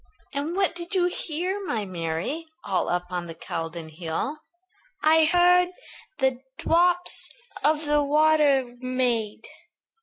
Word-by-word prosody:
"And 290 +5 -2
what 385 -1 +2
did 345 +2 -5
you 360 -1 +3
hear, 360 +3 -2
my 230 - -2
Mary, 180 - -3 0.2
All 195 -2 0
up 180 +1 -2
on 175 -1 -3
the 165 - -8
Caldon 165 0 -5
hill?" 165 - -4 0.6
"I 315 +1 +6
heard 355 +2 +5 0.5
the 265 -2 +1 0.2
drops 355 +1 +2 0.3
of 305 +1 +2
the 295 0 +3
water 290 -4 +3
made. 245 -4 -1
290 Hz, 125 wpm, -25 LUFS, 200-335 Hz, 0.6 s, I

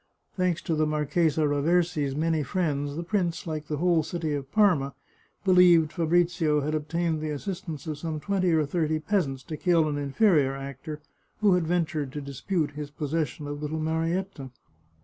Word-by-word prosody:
Thanks 180 -3 0
to 165 - -1
the 155 0 +1
Marchesa 155 +1 +1
Ra 145 0 0
versi's 160 -4 +1
many 160 +1 +1
friends, 145 -2 -1
the 170 - -3
prince, 175 -2 -1
like 155 -2 -4
the 150 - -2
whole 170 0 +3
city 160 0 -3
of 140 -1 -4
Parma, 180 -11 +3 0.5
believed 175 -4 +5
Fabrizio 170 -2 +2
had 150 +2 -2
obtained 160 +1 -1
the 155 - -3
assistance 160 0 -5
of 155 -2 -4
some 160 -1 -3
twenty 185 +1 0
or 160 -2 +3
thirty 155 +1 0
peasants 155 -6 -1
to 155 - -6
kill 170 -3 +3
an 145 -1 -2
inferior 145 -1 +2
actor 140 +3 -7 0.4
who 205 -3 +5
had 180 -3 +1
ventured 160 -5 -1
to 150 - -4
dispute 145 +4 -2
his 145 0 -6
possession 150 0 -3
of 145 0 -5
little 155 +1 -3
Marietta. 165 -1 -2
155 Hz, 170 wpm, -27 LUFS, 145-175 Hz, 0.5 s, believed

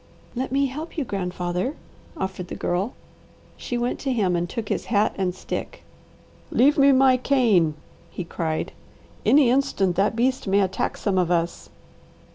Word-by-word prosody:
"Let 255 +1 -3
me 275 +1 +2
help 300 +6 -6
you, 300 - +1
grandfather," 180 - -2 0.4
offered 190 - -4
the - - -6
Girl. 185 +7 -2 0.6
She 245 - -4
went 240 +1 -1
to 270 - -2
him 200 -7 +1
and 175 0 -1
took 225 -2 -5
his - - -1
hat 215 -1 +2
and 185 -2 -1
stick. - - -6 0.7
"Leave 285 +5 +4
me 280 -3 +6
my 260 -1 +5
cane," 225 - +3 0.3
he 180 - -5
cried. 160 -2 -3 0.6
"Any 275 -4 +6
instant 245 -9 +1
that 200 +3 +2
beast 255 0 0
may 200 +1 +3
attack 190 -1 -1
some 195 -3 0
of 175 -2 +1
us." 170 -1 -1
210 Hz, 160 wpm, -24 LUFS, 180-260 Hz, 0.7 s, me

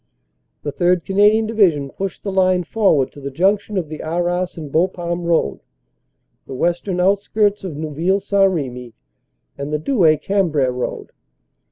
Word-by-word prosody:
The 145 - -3
3rd. 175 +2 +1
Canadian 210 +3 +3
Division 175 -11 +2
pushed 195 -1 -5
the 200 - -3
line 185 -1 +2
forward 170 -10 +1
to 145 - -13
the 140 - -4
junction 200 +7 0
of 175 -4 -1
the 155 0 -7
Arras 175 +2 -2
and 150 -4 -7
Bapaume 175 +1 -1
Road, 160 - +1 0.9
the 135 - -7
western 175 +5 -1
outskirts 205 +2 +1
of 180 -6 -5
Neuville 160 +5 0
St. 195 0 +2
Remy 125 -8 -5 0.6
and 140 +1 -4
the 150 - +1
Douai 165 - +3
Cambrai 160 -8 +1
Road. 125 0 -4
175 Hz, 150 wpm, -19 LUFS, 150-195 Hz, 0.9 s, Canadian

